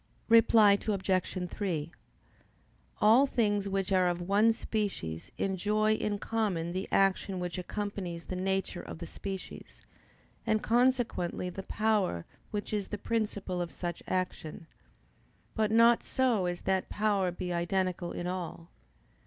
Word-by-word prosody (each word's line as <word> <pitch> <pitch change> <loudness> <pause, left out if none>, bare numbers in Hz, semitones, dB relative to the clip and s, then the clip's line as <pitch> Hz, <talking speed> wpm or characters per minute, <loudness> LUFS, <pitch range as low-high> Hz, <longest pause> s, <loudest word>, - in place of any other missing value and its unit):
Reply 225 -3 +6
Obj. 185 -2 0
3: 170 -6 -2 1.1
All 230 +6 +6
things 205 -6 +1
which 195 0 -1
are 185 -1 +4
of 175 0 0
one 200 +5 +3
species 200 - -3
enjoy 210 +3 +1
in 210 -1 -1
common 200 -7 -1
the 190 +2 -3
action 195 -1 +2
which 180 0 -3
accompanies 185 -3 -4
the 185 - -5
nature 190 0 -1
of - - -8
the 170 - -6
species, 190 +2 -8 0.6
and 215 -1 +1
consequently 235 -7 +1
the 195 - -6
power 205 - 0 0.2
which 210 0 -4
is 205 -2 -1
the 210 - -4
principle 205 -5 -2
of 175 - -4
such 175 -1 -5
action; 180 -4 -3 0.9
but 215 -2 +1
not 230 +1 +5
so 240 -8 +1
as 175 0 -3
that 190 -1 0
power 205 -3 +1
be 180 0 -4
identical 175 0 -1
in 175 - -4
all. 175 -2 -5
195 Hz, 135 wpm, -30 LUFS, 180-215 Hz, 1.1 s, Reply